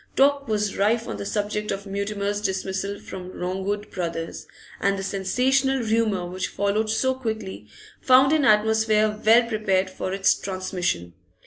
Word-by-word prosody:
Talk 280 Hz, 0 st, +3 dB
was 210 Hz, -2 st, -1 dB
rife 225 Hz, +4 st, +1 dB
on -, -, -4 dB
the 200 Hz, -, -5 dB
subject 210 Hz, 0 st, -2 dB
of 195 Hz, +1 st, -3 dB
Mutimer's 200 Hz, +1 st, -2 dB
dismissal 190 Hz, +1 st, -2 dB
from 185 Hz, -1 st, -9 dB
Longwood 190 Hz, +3 st, -3 dB
Brothers', 165 Hz, -2 st, -4 dB, 0.3 s
and 200 Hz, 0 st, +1 dB
the 195 Hz, -, -4 dB
sensational 255 Hz, +7 st, +1 dB
rumour 215 Hz, -4 st, +1 dB
which 185 Hz, +1 st, -3 dB
followed 205 Hz, +2 st, -1 dB
so 260 Hz, +4 st, +1 dB
quickly 220 Hz, -, -5 dB, 0.3 s
found 265 Hz, +3 st, +5 dB
an 310 Hz, -2 st, +3 dB
atmosphere 215 Hz, -2 st, +3 dB
well 230 Hz, +2 st, +6 dB
prepared 195 Hz, -4 st, 0 dB
for 185 Hz, -, -4 dB
its 195 Hz, 0 st, +3 dB
transmission. 185 Hz, -, -3 dB
205 Hz, 145 wpm, -24 LUFS, 190-220 Hz, 0.3 s, well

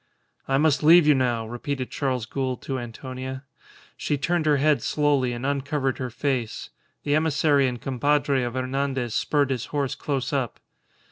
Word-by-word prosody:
"I 135 Hz, -, +2 dB
must 150 Hz, 0 st, +3 dB
leave 165 Hz, +2 st, +7 dB
you 150 Hz, -, +6 dB
now," 120 Hz, -4 st, 0 dB
repeated 130 Hz, +3 st, -4 dB
Charles 130 Hz, -5 st, -1 dB
Gould 130 Hz, +2 st, -3 dB
to 135 Hz, -1 st, -3 dB
Antonia. 130 Hz, +2 st, -7 dB, 0.5 s
She 145 Hz, -, -1 dB
turned 165 Hz, +2 st, 0 dB
her 150 Hz, -1 st, +4 dB
head 150 Hz, +1 st, +3 dB
slowly 145 Hz, -4 st, +1 dB
and 120 Hz, +2 st, -5 dB
uncovered 140 Hz, -1 st, -1 dB
her 130 Hz, -1 st, -3 dB
face. 120 Hz, -2 st, -3 dB, 0.3 s
The 145 Hz, -, 0 dB
emissary 150 Hz, -2 st, +3 dB
and 125 Hz, -1 st, -3 dB
compadre 140 Hz, +1 st, +1 dB
of 120 Hz, 0 st, -3 dB
Hernandez 130 Hz, -2 st, -2 dB
spurred 140 Hz, +2 st, +1 dB
his 125 Hz, -3 st, -2 dB
horse 140 Hz, -2 st, -2 dB
close 135 Hz, -1 st, -3 dB
up. 130 Hz, -4 st, -2 dB
135 Hz, 160 wpm, -25 LUFS, 130-145 Hz, 0.5 s, leave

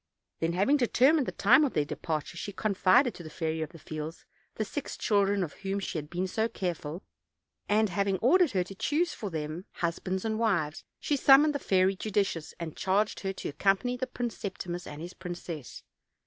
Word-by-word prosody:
Then 165 Hz, +1 st, 0 dB
having 200 Hz, +11 st, +3 dB
determined 265 Hz, +3 st, +4 dB
the -, -, -1 dB
time 250 Hz, +9 st, +5 dB
of 285 Hz, -, 0 dB
their 150 Hz, -, +2 dB
departure, 155 Hz, +2 st, -3 dB
she 205 Hz, -, -5 dB
confided 215 Hz, +5 st, +3 dB
to -, -, -10 dB
the 160 Hz, -, -8 dB
Fairy 160 Hz, 0 st, -2 dB
of 155 Hz, -, -3 dB
the 170 Hz, -, -13 dB
Fields 155 Hz, +1 st, -7 dB, 0.3 s
the 215 Hz, -, -1 dB
six 290 Hz, +7 st, -5 dB
children 200 Hz, -2 st, +2 dB
of 160 Hz, -, -5 dB
whom 195 Hz, 0 st, -1 dB
she 180 Hz, -4 st, -3 dB
had 150 Hz, 0 st, -9 dB
been 180 Hz, +2 st, -1 dB
so 220 Hz, +4 st, 0 dB
careful, 175 Hz, -4 st, -4 dB, 0.7 s
and 215 Hz, +1 st, +3 dB
having 195 Hz, +1 st, 0 dB
ordered 330 Hz, -, +4 dB
her 185 Hz, -2 st, +2 dB
to 185 Hz, -, -10 dB
choose 310 Hz, -, 0 dB
for 210 Hz, -, -5 dB
them 160 Hz, +2 st, -4 dB
husbands 185 Hz, +3 st, -2 dB
and 220 Hz, 0 st, -1 dB
wives, 175 Hz, -10 st, 0 dB, 0.2 s
she 295 Hz, -, 0 dB
summoned 285 Hz, +2 st, +6 dB
the 285 Hz, -, -2 dB
Fairy 190 Hz, -4 st, +2 dB
Judicious, 195 Hz, -5 st, -1 dB
and 165 Hz, -3 st, -5 dB
charged 200 Hz, +3 st, +1 dB
her 195 Hz, -1 st, -3 dB
to -, -, -5 dB
accompany 195 Hz, -, +1 dB
the 255 Hz, +1 st, -3 dB
Prince 245 Hz, -2 st, -4 dB
Septimus 180 Hz, -3 st, -5 dB
and 150 Hz, +2 st, -7 dB
his 175 Hz, +1 st, -7 dB
princess. 175 Hz, -6 st, -7 dB
195 Hz, 195 wpm, -29 LUFS, 170-225 Hz, 0.7 s, summoned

